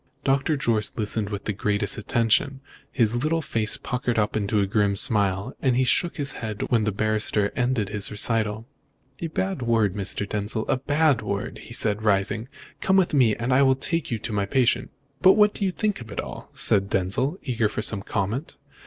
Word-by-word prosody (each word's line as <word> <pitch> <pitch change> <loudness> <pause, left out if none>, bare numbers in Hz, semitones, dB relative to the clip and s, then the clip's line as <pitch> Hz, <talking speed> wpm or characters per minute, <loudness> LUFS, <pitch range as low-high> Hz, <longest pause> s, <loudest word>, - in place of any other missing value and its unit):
Doctor 135 +3 +1
Jorce 115 -6 0
listened 105 -1 -2
with 100 -1 -5
the 105 - -1
greatest 105 +6 0
attention, 115 +4 +1 0.3
his 120 +1 +1
little 160 +1 0
face 110 -4 0
puckered 125 -1 -2
up 105 -1 0
into 105 0 0
a 100 - +2
grim 100 0 +1
smile, 100 +2 +1
and 125 -2 +2
shook 175 +7 +2
his 140 -3 0
head 110 -2 -5
when 115 -3 +3
the 105 - +1
barrister 105 0 0
ended 125 -5 0
his 100 -1 -1
recital. 110 0 0 0.5
"A 170 - -3
bad 190 0 -2
world, 115 -5 +1
Mr. 100 0 0
Denzil, 105 +2 -2
a - - +1
bad 145 -1 +2
world!" 100 +4 -4
he - - -11
said, 105 -3 +1
rising. 105 +2 +1 0.3
"Come 190 0 +3
with 185 -4 +2
me, 120 -7 +4
and 120 +2 -1
I'll 135 0 +4
take 165 +5 -1
you 115 - -1
to 110 - -6
see - - -3
my 100 -1 0
patient." 125 +1 +1 0.3
"But 190 - +7
what 210 -1 +4
do 200 - -2
you - - +2
think 210 - -2
of 115 - -10
it 100 - -6
all?" - - -7
said 100 -1 +1
Denzil, 100 - 0
eager 115 -4 0
for 110 - -4
some 100 -2 +1
comment. 110 - -3
115 Hz, 195 wpm, -24 LUFS, 105-130 Hz, 0.5 s, But